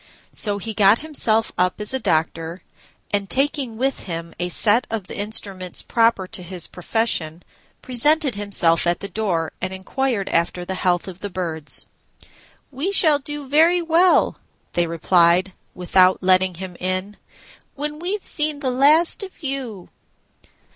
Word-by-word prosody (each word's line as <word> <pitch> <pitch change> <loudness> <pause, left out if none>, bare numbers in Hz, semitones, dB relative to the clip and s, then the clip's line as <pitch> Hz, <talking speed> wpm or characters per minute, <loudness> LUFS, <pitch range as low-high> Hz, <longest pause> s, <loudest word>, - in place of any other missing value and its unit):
So 205 -2 +2
he 220 +2 -5
got 205 +1 +5
himself 225 -7 0
up 180 +2 +1
as 210 +4 0
a 265 - -1
doctor, 165 -2 -1 0.5
and, 200 -1 -1
taking 270 -4 -1
with 270 +3 -1
him 170 -2 -6
a 175 0 -2
set 215 +6 +3
of 220 -4 -4
the - - -9
instruments 200 -4 -1
proper 230 -5 +2
to 185 - -4
his 180 -1 -1
profession, 180 -4 -2 0.4
presented 285 +3 +2
himself 195 -5 +1
at 175 - 0
the 200 - -5
door, 185 -5 -2
and 185 - -3
inquired 200 +3 -2
after 170 +1 -1
the 190 - -4
health 180 -1 0
of 185 -1 -9
the 205 - -5
Birds. 170 -5 -3 0.9
"We 290 +9 -2
shall 310 -7 +4
do 295 0 -6
very 330 +5 +4
well," 335 +2 +3 0.3
they 175 -1 +1
replied, 175 +2 +3 0.2
without 185 +1 +3
letting 185 -1 +3
him 180 0 -8
in, 185 +3 -3 0.6
"when 300 +1 -5
we've 380 +4 -4
seen 300 -1 0
the 270 -3 -2
last 300 +9 +4
of 380 -3 -9
you." 260 -9 -5
205 Hz, 150 wpm, -21 LUFS, 180-270 Hz, 0.9 s, got